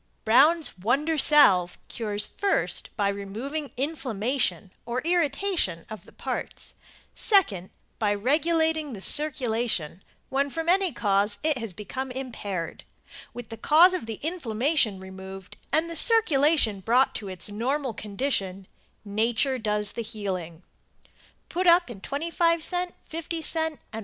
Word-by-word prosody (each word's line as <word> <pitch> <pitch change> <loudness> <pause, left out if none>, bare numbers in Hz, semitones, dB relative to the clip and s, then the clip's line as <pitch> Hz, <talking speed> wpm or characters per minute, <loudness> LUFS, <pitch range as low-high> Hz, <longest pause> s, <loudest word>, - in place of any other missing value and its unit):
Brown's 285 - +4
Wonder 275 - +1
Salve 205 - +5
cures 210 -2 -1
first 400 0 -1
by 205 -2 +1
removing 225 +10 -5
inflammation 255 - -2
or 240 +2 -3
irritation 335 - 0
of 215 - -9
the - - -16
parts; - - -5 0.4
second 210 - +2 0.3
by 210 -2 +1
regulating 315 +5 +1
the 200 - -8
circulation 230 - +2 0.3
when 275 +1 0
from 325 +3 -4
any 375 0 +3
cause 205 -2 +1
it 310 -1 +3
has 225 -4 -4
become 255 +8 -6
impaired. 220 -10 -5 0.5
With 245 -2 -9
the 225 - -8
cause 335 +8 +6
of 355 -11 -3
the 225 -2 -6
inflammation 270 - 0
removed 190 0 -10 0.2
and 320 +2 +1
the 335 - -6
circulation 305 - +3
brought 240 +7 +2
to 205 - -6
its 185 +1 -5
normal 255 +4 -2
condition 200 -3 -3 0.4
nature 230 +6 0
does 210 -2 -1
the - - -5
healing. 190 -7 -5 0.8
Put 365 +1 -1
up 345 -5 +5
in 195 -5 -10
25c, 335 - -1 0.2
50c 330 0 -1
and 320 -1 -1 0.2
$1. 220 - -4
255 Hz, 130 wpm, -26 LUFS, 205-315 Hz, 0.8 s, cause